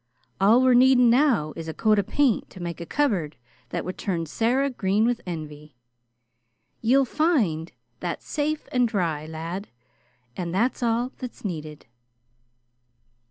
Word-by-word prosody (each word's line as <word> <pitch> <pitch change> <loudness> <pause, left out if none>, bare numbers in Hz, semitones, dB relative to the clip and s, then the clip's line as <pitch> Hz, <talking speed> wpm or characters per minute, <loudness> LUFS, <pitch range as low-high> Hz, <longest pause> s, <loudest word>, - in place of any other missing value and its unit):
All 220 +6 +5
we're, 255 -1 +5
needing 250 -1 +6
now 240 - +3
is 165 -1 -7
a 160 - -5
coat 215 -2 +3
of 200 - -2
paint 275 -7 +1
to 185 - -13
make 170 -1 -5
a 170 - -7
cupboard 195 - 0 0.3
that - - -3
would 185 - -6
turn 170 -4 -2
Sarah 250 - +1
green 210 -2 +1
with 240 0 0
envy. 150 -4 -7 1.1
Ye'll 265 +4 +4
find 230 - +1 0.3
that - - -4
safe 305 +1 -2
an' 250 -1 +3
dry, 165 -8 -2
lad, 165 +5 -5 0.7
an' 175 -2 -4
that's 230 +10 0
all 240 +1 0
that's 250 -4 -8
needed." 155 -5 -6
210 Hz, 145 wpm, -25 LUFS, 165-250 Hz, 1.1 s, needing